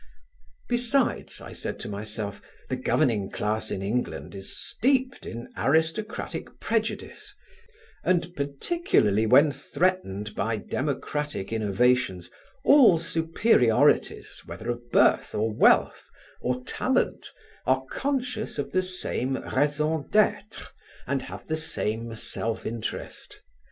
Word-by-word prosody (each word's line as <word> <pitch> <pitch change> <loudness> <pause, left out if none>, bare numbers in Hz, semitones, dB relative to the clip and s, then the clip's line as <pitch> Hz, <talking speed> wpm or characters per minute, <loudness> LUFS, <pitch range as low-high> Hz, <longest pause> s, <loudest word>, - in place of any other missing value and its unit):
Besides, 245 +2 0
I - - -9
said - - -5
to - - -5
myself, 105 0 -5 0.3
the 130 - 0
governing 120 -6 +1
class 110 +1 -2
in 95 - -3
England 115 +5 -2
is 95 -1 -7
steeped 260 0 0
in 120 +2 -6
aristocratic 160 +9 -1
prejudice, - - -3 0.7
and 175 -1 +1
particularly 140 - +1
when 140 +5 +6
threatened 135 - -1
by 110 +1 -1
democratic 140 -1 -3
innovations, 110 -3 +1 0.3
all 260 - +7
superiorities, 165 - +2
whether 120 +2 -4
of 120 0 -7
birth - - +3
or 110 +1 0
wealth, - - +3 0.3
or 125 0 -1
talent, - - 0 0.4
are 130 0 +2
conscious 250 - -2
of - - -3
the 185 - +2
same 180 -8 -2 0.2
raison 150 +2 +1
d'être 210 0 +1 0.3
and - - -1
have - - -9
the 160 - -1
same 115 -7 -3
self 115 0 -4
interest. 115 -1 -5
130 Hz, 110 wpm, -26 LUFS, 110-180 Hz, 0.7 s, all